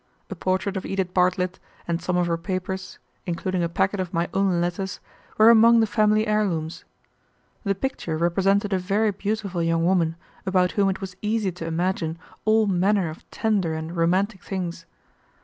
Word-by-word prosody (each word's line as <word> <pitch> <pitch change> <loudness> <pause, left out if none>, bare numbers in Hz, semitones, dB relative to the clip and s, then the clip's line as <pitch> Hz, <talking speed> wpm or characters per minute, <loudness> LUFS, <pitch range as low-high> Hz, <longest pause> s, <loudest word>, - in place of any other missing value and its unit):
A - - -3
portrait 185 +3 -1
of 190 - -4
Edith 190 -2 -2
Bartlett 180 0 +1 0.3
and 170 0 -1
some 180 +1 -1
of 180 - +2
her 170 -1 0
papers, 185 +2 -4 0.3
including 180 +1 -1
a 170 - 0
packet 190 +4 0
of 185 -1 -3
my 170 +1 0
own 190 -2 +2
letters, 175 +2 -2 0.4
were 220 +2 +8
among 230 +1 +7
the 225 - +4
family 215 0 +2
heirlooms. 190 -7 -1 0.8
The 200 0 +1
picture 185 -8 -3
represented 195 +4 +2
a 190 - +2
very 205 +4 +1
beautiful 200 -2 -3
young 165 0 +1
woman 170 -3 +2 0.3
about 185 -2 +2
whom 200 +1 +2
it 190 - -3
was 190 -1 -6
easy 210 -2 0
to 170 -1 -7
imagine 165 -1 -1 0.3
all 220 0 +4
manner 190 -2 +2
of 155 - -14
tender 200 -8 0
and 160 +2 -5
romantic 185 +4 +1
things. 175 -3 -5
185 Hz, 170 wpm, -24 LUFS, 170-200 Hz, 0.8 s, were